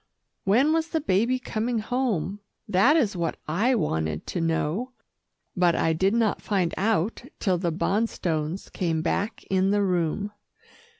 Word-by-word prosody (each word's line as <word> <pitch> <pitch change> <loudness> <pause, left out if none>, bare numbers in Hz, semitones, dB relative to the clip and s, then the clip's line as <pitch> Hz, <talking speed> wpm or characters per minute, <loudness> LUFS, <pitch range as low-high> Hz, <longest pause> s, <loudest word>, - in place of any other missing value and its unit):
When 250 +11 +4
was 325 0 +1
the 325 - -1
baby 230 +1 +2
coming 235 -1 -2
home, 215 -5 -1 0.3
that 215 - +4
is 220 -10 +1
what 170 -2 -2
I 215 +12 +2
wanted 80 - -1
to 175 - -3
know, 165 +9 -1 0.6
but 175 -2 +3
I 160 - +2
did 190 +6 +2
not 225 -3 +1
find 185 -5 0
out 210 0 0 0.2
till 185 -4 +1
the 175 -2 0
Bonstones 175 -3 -1
came 165 -3 -1
back 200 +5 -1
in 190 0 +3
the 205 0 +2
room. 180 +2 0
195 Hz, 145 wpm, -26 LUFS, 170-230 Hz, 0.6 s, When